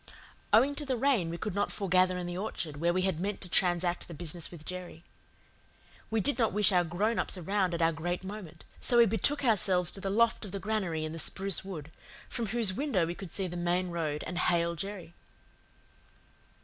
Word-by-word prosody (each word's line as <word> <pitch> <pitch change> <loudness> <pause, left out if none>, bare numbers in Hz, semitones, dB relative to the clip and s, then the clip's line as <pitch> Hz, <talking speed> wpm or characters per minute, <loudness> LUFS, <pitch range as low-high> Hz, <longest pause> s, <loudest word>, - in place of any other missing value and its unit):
Owing 255 +7 +5
to 300 - 0
the 265 -3 -1
rain 240 -9 +2
we 170 - -4
could 210 +2 -3
not 200 +1 0
foregather 185 -1 +2
in 180 - -3
the 175 0 -4
orchard, 175 -6 -3
where 170 +3 +2
we 185 +1 +1
had 185 -4 0
meant 200 +2 -2
to 185 - -2
transact 175 0 +2
the 170 - -8
business 170 +1 -3
with 160 -3 -11
Jerry. 180 -2 -6 1.1
We 225 0 +1
did 285 +5 +1
not 225 -5 +2
wish 210 0 +4
our 180 -2 +4
grown 200 +7 0
ups - - 0
around 185 0 0
at 170 - 0
our 165 - +4
great 175 +3 -3
moment, 190 -5 -8 0.2
so 240 - +2
we 235 - +8
betook 230 +7 +1
ourselves 190 -6 +3
to 195 - -5
the 195 - -2
loft 230 +4 +2
of 200 -3 -8
the 200 - -3
granary 190 -7 -1
in 155 - -4
the 165 - -5
spruce 190 +5 0
wood, 165 -6 -7 0.4
from 235 -3 -3
whose 220 -2 +2
window 230 - +1
we 170 - -3
could 185 0 -8
see 190 +3 -2
the 175 -1 -5
main 175 +1 0
road 155 -3 -2
and 180 -1 -3
hail 170 -1 +2
Jerry. 185 0 -6
185 Hz, 215 wpm, -30 LUFS, 170-210 Hz, 1.1 s, we